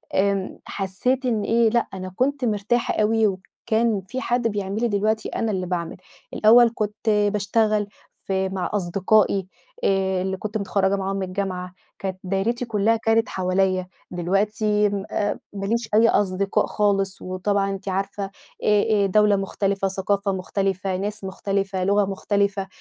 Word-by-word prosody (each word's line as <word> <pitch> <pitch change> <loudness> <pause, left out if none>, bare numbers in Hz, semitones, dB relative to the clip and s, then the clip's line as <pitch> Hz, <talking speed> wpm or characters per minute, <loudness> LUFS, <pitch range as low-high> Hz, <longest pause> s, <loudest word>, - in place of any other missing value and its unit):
آمم، 195 -1 0
حسيت 225 +8 -1
إن 225 -4 +1
إيه، 230 0 +3
لأ، 235 +1 +1
أنا 185 -1 -6
كنت 270 0 0
مرتاحة 220 +2 0
أوي 220 0 +3
وكان 215 +3 -1
في 260 +4 -4
حد 240 -1 +1
بيعمل 205 0 -3
لي، 240 - +3
دلوقتي 215 +1 0
أنا 225 - -1
اللي 185 -2 -2
باعمل، 175 -2 -3 0.4
الأول 230 +2 +6
كنت 210 +1 -2
باشتغل 210 0 +2 0.4
في 190 0 0
مع 190 -1 -3
أصدقائي 195 +1 +2 0.4
آآ، 190 -1 +1
اللي 190 0 -2
كنت 215 +2 -3
متخرّجة 200 -1 +1
معاهم 195 0 -2
من 195 - -2
الجامعة، 185 -1 -4 0.3
كانت 190 -1 -4
دايرتي 200 +6 -1
كلّها 220 0 +2
كانت 225 0 +2
حواليّا، 185 0 0 0.2
دلوقتي 210 +4 +1
أ 205 +1 -2
ما 195 -1 -4
ليش 230 +2 -1
أي 230 +2 +6
أصدقاء 195 0 +1
خالص 195 -2 0
وطبعًا 195 +2 -1
أنتِ 195 0 -5
عارفة 195 +2 -2 0.4
آآ 210 0 +3
آآ، - - +3
دولة 210 +1 +4
مختلفة، 195 0 -1
ثقافة 195 +1 0
مختلفة، 190 0 -1
ناس 205 +2 -4
مختلفة، 195 0 -2
لغة 200 +1 +3
مختلفة، 200 0 -1
200 Hz, 145 wpm, -23 LUFS, 190-215 Hz, 0.4 s, الأول